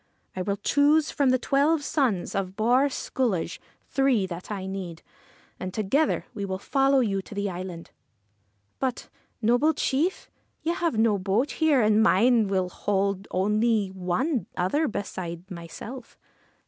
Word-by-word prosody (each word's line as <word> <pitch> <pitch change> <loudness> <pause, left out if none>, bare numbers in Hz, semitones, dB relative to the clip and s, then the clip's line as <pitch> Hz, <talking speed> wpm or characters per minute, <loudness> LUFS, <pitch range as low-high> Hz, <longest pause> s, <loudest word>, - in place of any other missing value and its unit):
I 185 - -2
will 200 +2 -1
choose, 290 +8 +3
from 280 -2 +2
the 255 - +4
twelve 285 +4 +2
sons 250 - 0
of 190 -1 -2
Bawr 245 +6 +3
Sculloge, 220 -11 -2 0.3
three 270 -7 +2
that 180 -1 -7
I 200 -3 -4
need, 190 -4 -6 0.6
and 185 - -4
together 225 +10 +1
we 205 -4 -5
will 190 -1 -2
follow 270 +6 +2
you 195 -5 0
to 205 - -11
the 200 -1 -1
island.' 175 -1 -7 0.5
' 100 0 -45
But, 260 -2 -2 0.3
noble 245 +8 +3
chief, 315 +8 0 0.4
you 335 - +1
have 340 -8 -1
no 220 -2 +3
boat 200 +9 0
here, 300 -6 +3
and 215 0 +4
mine 225 +2 +4
will 190 -2 0
hold 195 0 -1
only 210 +2 +1
one 190 - -1
other 290 - +1
beside 185 -3 -5
myself.' 185 +9 -9
210 Hz, 150 wpm, -26 LUFS, 190-265 Hz, 0.6 s, the